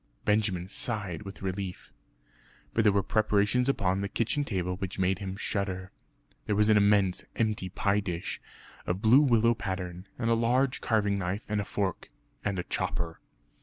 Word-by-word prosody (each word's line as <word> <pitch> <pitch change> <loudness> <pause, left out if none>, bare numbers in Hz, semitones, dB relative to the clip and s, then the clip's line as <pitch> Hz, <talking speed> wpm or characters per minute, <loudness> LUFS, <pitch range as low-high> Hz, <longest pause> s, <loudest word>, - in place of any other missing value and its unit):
Benjamin 105 -4 +1
sighed 100 -4 -2
with 95 -1 -9
relief. 95 -4 -4 0.8
But 115 - +2
there 105 - +6
were 100 0 +2
preparations 110 +4 +2
upon 95 -7 +1
the 100 - -2
kitchen 120 +8 0
table 90 -8 -2
which 95 0 -5
made 95 0 +1
him 95 -2 -4
shudder. 95 -3 -3 0.6
There 105 - +1
was 105 +1 +4
an 110 - +6
immense 100 -3 +3
empty 105 -4 0
pie 100 +2 +1
dish 90 -4 -4 0.5
of 90 +5 -2
blue 120 +6 +7
willow 115 -4 +4
pattern, 95 -3 -5
and 115 -1 0
a - - +6
large 125 +3 +2
carving 105 -3 +1
knife 95 +4 -2
and 105 -2 -1
fork, 100 -2 -2 0.3
and 100 -2 -1
a 90 - -1
chopper. 85 -1 -2
100 Hz, 165 wpm, -29 LUFS, 95-110 Hz, 0.8 s, blue